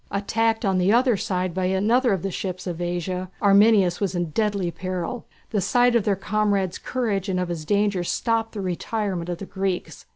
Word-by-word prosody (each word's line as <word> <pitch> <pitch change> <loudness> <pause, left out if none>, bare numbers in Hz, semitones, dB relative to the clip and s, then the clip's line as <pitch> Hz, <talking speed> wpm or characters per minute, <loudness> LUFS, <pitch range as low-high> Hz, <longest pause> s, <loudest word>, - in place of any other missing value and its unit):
Attacked 225 +3 0
on 190 -2 +2
the 185 +2 +3
other 245 +1 +4
side 185 -3 -2
by 185 +1 -1
another 220 +7 +2
of 190 -4 -1
the 195 - -2
ships 185 +1 -4
of 175 -2 -4
Asia, 175 +1 -3
Arminias 200 -3 +5
was 195 -2 -1
in 175 -2 -2
deadly 200 -3 0
peril. 185 +6 -4 0.3
The 210 -3 +1
sight 245 +4 +3
of 230 - +2
their 205 - +2
comrade's 200 -2 0
courage 210 -6 -2
and 185 -1 0
of 180 -1 -2
his 165 -3 -4
danger 200 0 +1
stopped 225 +4 -1
the 210 - -4
retirement 185 -1 -3
of 175 - -2
the 195 - -7
Greeks. 190 -2 -4
195 Hz, 195 wpm, -24 LUFS, 180-215 Hz, 0.3 s, Arminias